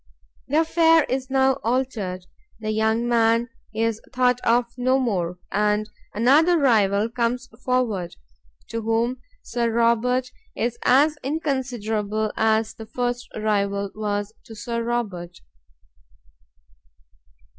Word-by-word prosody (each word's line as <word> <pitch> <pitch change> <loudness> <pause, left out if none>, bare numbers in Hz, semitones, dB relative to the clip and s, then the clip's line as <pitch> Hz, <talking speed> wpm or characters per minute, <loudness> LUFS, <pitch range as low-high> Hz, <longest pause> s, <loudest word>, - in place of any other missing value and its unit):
The 300 +4 +3
affair 325 0 +4
is 260 0 -3
now 265 0 +2
altered, 225 -7 -2 0.3
that 215 -1 -3
young 220 +2 +1
man 230 0 +2 0.2
is 225 0 -1
thought 250 -1 +2
of 240 0 +2
no 255 +1 +2
more, 180 -9 -1
and 210 +1 +1 0.3
another 295 +10 +4
rival 215 -7 +3
comes 240 +2 -2 0.2
forward, 230 -9 -1 0.5
to 230 0 -3
whom 230 +3 0 0.2
Sir 235 -1 -1
Robert 235 +2 +2 0.2
is 235 0 -2
as 295 +4 +4
inconsiderable 230 -8 -2
as 220 0 +1
the 225 -1 -10
first 245 0 -2
rival 200 -2 0
was 205 0 -3
to 225 - -11
Sir 235 +2 -3
Robert." 200 -7 -3
230 Hz, 115 wpm, -23 LUFS, 215-255 Hz, 0.5 s, affair